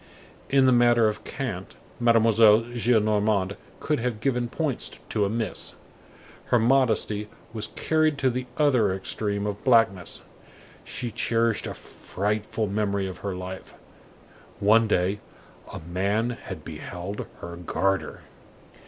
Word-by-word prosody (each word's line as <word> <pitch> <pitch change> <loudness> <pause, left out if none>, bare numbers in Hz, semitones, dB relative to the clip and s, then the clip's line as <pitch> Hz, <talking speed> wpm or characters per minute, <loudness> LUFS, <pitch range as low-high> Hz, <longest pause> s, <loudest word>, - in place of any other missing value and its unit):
In 135 -1 +4
the 130 - +5
matter 120 -2 +5
of 105 - -3
cant, 105 -9 -5 0.2
Mademoiselle 115 -2 +5
Gillenormand 105 -4 +2 0.2
could 150 -3 0
have 115 -2 -2
given 125 -1 0
points 150 -2 -3
to 105 -2 +1
a - - -1
miss. 110 -2 -3 0.7
Her 120 - +3
modesty 110 -4 +2 0.2
was 110 -2 0
carried 155 -2 +1
to 135 -2 +2
the 125 +1 -4
other 125 -10 +3
extreme 100 +1 -2
of 105 -1 -4
blackness. 115 -8 +2 0.6
She 120 -2 -5
cherished 115 0 0
a - - -5
frightful 105 +2 -3
memory 100 -1 -1
of 95 -2 -6
her 100 -2 -4
life; 90 +1 -8 0.8
one 110 +3 +5
day, 95 0 +1 0.5
a - - -6
man 100 +8 0
had 95 -9 -8
beheld 90 +5 -6
her 85 0 -7
garter. 90 0 -1
110 Hz, 125 wpm, -26 LUFS, 100-120 Hz, 0.8 s, the